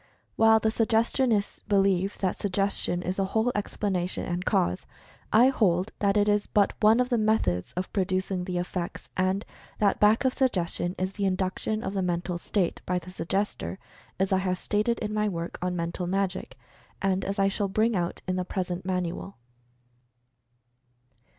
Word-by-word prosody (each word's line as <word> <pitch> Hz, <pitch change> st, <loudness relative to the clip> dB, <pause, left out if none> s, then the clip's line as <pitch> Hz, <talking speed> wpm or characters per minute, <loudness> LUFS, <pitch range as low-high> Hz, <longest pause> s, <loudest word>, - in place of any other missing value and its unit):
While 225 Hz, 0 st, +6 dB
the 220 Hz, -, +1 dB
"Suggestionists" 225 Hz, -1 st, +1 dB
believe 195 Hz, -1 st, +2 dB
that 190 Hz, -2 st, +1 dB
Suggestion 195 Hz, -2 st, -1 dB
is 185 Hz, +1 st, -2 dB
the 195 Hz, -, +1 dB
whole 220 Hz, +5 st, +1 dB
explanation 195 Hz, -3 st, -2 dB
and 175 Hz, 0 st, -2 dB
cause, 90 Hz, -, 0 dB, 0.4 s
I 240 Hz, +4 st, +6 dB
hold 190 Hz, -6 st, +1 dB
that 200 Hz, 0 st, +2 dB
it 205 Hz, 0 st, +3 dB
is 205 Hz, 0 st, +2 dB
but 205 Hz, -1 st, +2 dB
one 220 Hz, +2 st, +5 dB
of 250 Hz, 0 st, +1 dB
the 240 Hz, -3 st, +2 dB
methods 160 Hz, -, +1 dB
of 180 Hz, +1 st, -4 dB
producing 185 Hz, -1 st, -1 dB
the 180 Hz, -1 st, -3 dB
effects, 175 Hz, 0 st, -4 dB
and 185 Hz, +2 st, 0 dB, 0.3 s
that 200 Hz, -2 st, +2 dB
back 215 Hz, +5 st, +4 dB
of 260 Hz, -, +3 dB
Suggestion 180 Hz, -8 st, 0 dB
is 185 Hz, +1 st, -2 dB
the 200 Hz, 0 st, -2 dB
Induction 190 Hz, +3 st, -1 dB
of 190 Hz, -, -3 dB
the 195 Hz, -, 0 dB
Mental 175 Hz, 0 st, -1 dB
State 185 Hz, -1 st, -1 dB
by 180 Hz, -, +1 dB
the 180 Hz, +1 st, -7 dB
Suggestor, 195 Hz, +2 st, -2 dB, 0.4 s
as 190 Hz, +1 st, +1 dB
I 190 Hz, -, +3 dB
have 185 Hz, -1 st, -1 dB
stated 215 Hz, +4 st, 0 dB
in 210 Hz, -1 st, -3 dB
my 210 Hz, 0 st, +1 dB
work 170 Hz, -2 st, -5 dB
on 180 Hz, 0 st, -1 dB
"Mental 170 Hz, +1 st, -3 dB
Magic," 190 Hz, 0 st, -2 dB, 0.4 s
and 190 Hz, -1 st, 0 dB
as 200 Hz, +1 st, -3 dB
I 195 Hz, 0 st, +3 dB
shall 200 Hz, +1 st, 0 dB
bring 220 Hz, +3 st, +1 dB
out 175 Hz, -2 st, -2 dB
in 185 Hz, 0 st, 0 dB
the 185 Hz, -, 0 dB
present 180 Hz, -1 st, -3 dB
manual. 180 Hz, +1 st, -3 dB
195 Hz, 170 wpm, -27 LUFS, 180-210 Hz, 0.4 s, While